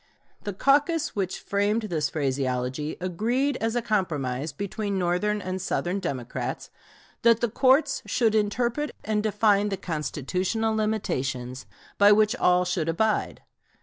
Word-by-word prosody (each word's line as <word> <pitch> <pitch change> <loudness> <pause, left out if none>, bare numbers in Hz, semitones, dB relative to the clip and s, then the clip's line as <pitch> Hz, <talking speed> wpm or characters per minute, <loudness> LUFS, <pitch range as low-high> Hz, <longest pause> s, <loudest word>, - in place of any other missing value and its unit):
The 205 - -3
caucus 290 - +2
which 190 -3 -2
framed 205 +3 0
this 165 -8 -1
phraseology 135 0 -2
agreed, 235 +10 0
as 225 +1 -1
a 240 - 0
compromise 150 - -1
between 200 +5 -3
Northern 185 +4 0
and 185 0 -3
Southern 180 +1 -1
Democrats, 135 -10 -4 0.5
that 230 -1 +5
the 240 - +1
courts 265 +6 +3
should 225 -3 +2
interpret 235 +7 0
and 210 0 0
define 210 -1 +2
the 195 - -2
constitutional 180 - -2
limitations, 135 - -2 0.3
by 205 0 +7
which 215 +3 +3
all 180 -5 +3
should 175 -3 -1
abide. 215 +6 0
200 Hz, 130 wpm, -26 LUFS, 165-220 Hz, 0.5 s, by